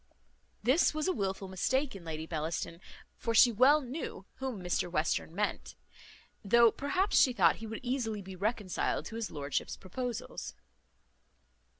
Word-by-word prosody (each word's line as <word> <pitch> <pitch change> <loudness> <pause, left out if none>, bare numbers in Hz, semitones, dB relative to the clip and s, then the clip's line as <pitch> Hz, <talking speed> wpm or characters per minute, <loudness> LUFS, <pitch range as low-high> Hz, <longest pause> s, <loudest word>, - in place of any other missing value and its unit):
This 275 +7 +3
was 310 +3 0
a 370 - +2
wilful 195 -2 -2
mistake 260 +8 0
in 190 - -9
Lady 160 -1 -5
Bellaston, 165 +1 -3 0.4
for 230 -1 -2
she 240 +2 +8
well 265 +7 +5
knew 255 - -6
whom 260 -5 -4
Mr 180 0 0
Western 160 0 -1
meant; 210 +1 -2 0.7
though 235 +3 +6
perhaps 365 +9 +1
she 255 - +4
thought - - +4
he 225 - -7
would 225 0 -6
easily 235 -5 -2
be 190 0 -9
reconciled 205 0 -1
to 225 - -7
his 225 -2 -3
lordship's 145 -1 -3
proposals. 240 +5 -5
220 Hz, 145 wpm, -31 LUFS, 185-255 Hz, 0.7 s, she